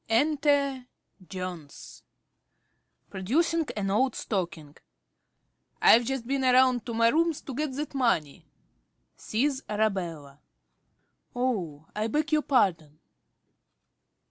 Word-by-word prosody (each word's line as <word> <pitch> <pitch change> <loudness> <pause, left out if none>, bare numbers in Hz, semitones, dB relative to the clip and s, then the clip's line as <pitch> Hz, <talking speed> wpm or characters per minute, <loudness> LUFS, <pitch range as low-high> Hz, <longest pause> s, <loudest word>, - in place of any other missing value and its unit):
Enter 280 0 +1 0.4
Jones. 180 -6 -8
~Jones~ - - -42 1.1
(producing 310 - 0
an 195 -1 -1
old 255 +5 +1
stocking). 170 -7 -4 1.0
I've 235 +1 +6
just 265 -1 -3
been 270 +2 -1
round 255 -2 +3
to 235 - -4
my 230 0 +4
rooms 330 +2 +1
to 270 - -8
get 300 +2 -2
that 295 +3 -5
money 230 - -1 0.7
(sees 265 +4 -1
Arabella) 175 -10 -2 1.0
oh, 185 - -2
I 215 +1 -1
beg 300 +6 -1
your 305 0 +3
pardon. 165 - 0
235 Hz, 105 wpm, -27 LUFS, 185-275 Hz, 1.1 s, I've